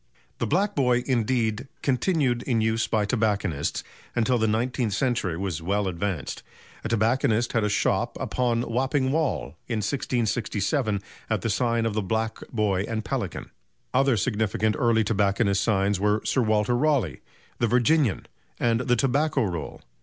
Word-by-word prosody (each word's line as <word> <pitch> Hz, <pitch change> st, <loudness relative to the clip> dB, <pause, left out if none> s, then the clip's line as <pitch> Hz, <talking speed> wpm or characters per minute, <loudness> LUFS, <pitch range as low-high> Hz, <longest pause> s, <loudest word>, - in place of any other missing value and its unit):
The -, -, 0 dB
"Black 195 Hz, +6 st, +1 dB
Boy," 125 Hz, -3 st, +2 dB
indeed, 120 Hz, -1 st, 0 dB, 0.2 s
continued 135 Hz, -2 st, +1 dB
in 120 Hz, -3 st, 0 dB
use 110 Hz, +1 st, +1 dB
by 110 Hz, -2 st, +1 dB
tobacconists 100 Hz, -, -1 dB, 0.3 s
until 120 Hz, +1 st, +2 dB
the 110 Hz, -, +2 dB
nineteenth 115 Hz, 0 st, 0 dB
century 110 Hz, -8 st, 0 dB
was 90 Hz, -4 st, -3 dB
well 100 Hz, +4 st, 0 dB
advanced. 90 Hz, -3 st, -3 dB, 0.4 s
A 110 Hz, -, -3 dB
tobacconist 115 Hz, +1 st, +1 dB
had 115 Hz, -, +2 dB
a 105 Hz, -, +1 dB
shop 100 Hz, -, 0 dB
"uppon 120 Hz, -2 st, 0 dB
Wapping 130 Hz, +3 st, 0 dB
Wall" 155 Hz, -1 st, -1 dB
in 115 Hz, -, -1 dB
1667 110 Hz, -1 st, -1 dB, 0.3 s
at 110 Hz, -4 st, 0 dB
the 115 Hz, -, -1 dB
sign 115 Hz, +1 st, +1 dB
of 115 Hz, -, 0 dB
the 110 Hz, -, 0 dB
"Black 110 Hz, +3 st, -2 dB
Boy 105 Hz, -5 st, +1 dB
and 110 Hz, -1 st, -3 dB
Pelican." -, -, -4 dB, 0.4 s
Other 135 Hz, -2 st, +3 dB
significant 110 Hz, -1 st, 0 dB
early 115 Hz, -2 st, +3 dB
tobacconists' 100 Hz, -1 st, +1 dB
signs 100 Hz, -3 st, +1 dB
were 105 Hz, +2 st, +1 dB
"Sir 130 Hz, -, +2 dB
Walter 110 Hz, +1 st, +2 dB
Raleigh," 125 Hz, -, +1 dB, 0.4 s
"The 120 Hz, -, +2 dB
Virginian" 125 Hz, +1 st, +2 dB, 0.3 s
and 115 Hz, -1 st, +2 dB
"The 125 Hz, -1 st, +2 dB
Tobacco 135 Hz, +2 st, +1 dB
Roll." 85 Hz, -7 st, -4 dB
115 Hz, 150 wpm, -25 LUFS, 105-125 Hz, 0.4 s, Other